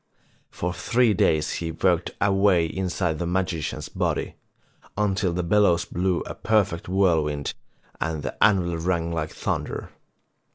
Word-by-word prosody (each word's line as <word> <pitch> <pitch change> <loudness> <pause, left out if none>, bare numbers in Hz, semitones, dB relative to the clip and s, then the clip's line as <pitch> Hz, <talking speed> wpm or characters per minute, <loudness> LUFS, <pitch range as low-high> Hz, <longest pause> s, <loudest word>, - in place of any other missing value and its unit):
For 90 +1 -3
three 120 +2 +2
days 80 -4 +2
he 85 -1 -3
worked 85 +1 +1
away 95 -3 +3
inside 90 -1 -2
the 85 - -2
magician's 90 -3 -2
body, - - -2 0.6
until 100 -2 +1
the 90 +1 -2
bellows 90 -2 +3
blew 90 0 -1
a - - -6
perfect 100 -6 0
whirl 90 -5 +3
wind 75 -1 -3 0.5
and 80 -2 -2
the - - -4
anvilirang 85 -3 +1
like 80 -2 -2
thunder. - - -3
90 Hz, 130 wpm, -25 LUFS, 85-95 Hz, 0.6 s, away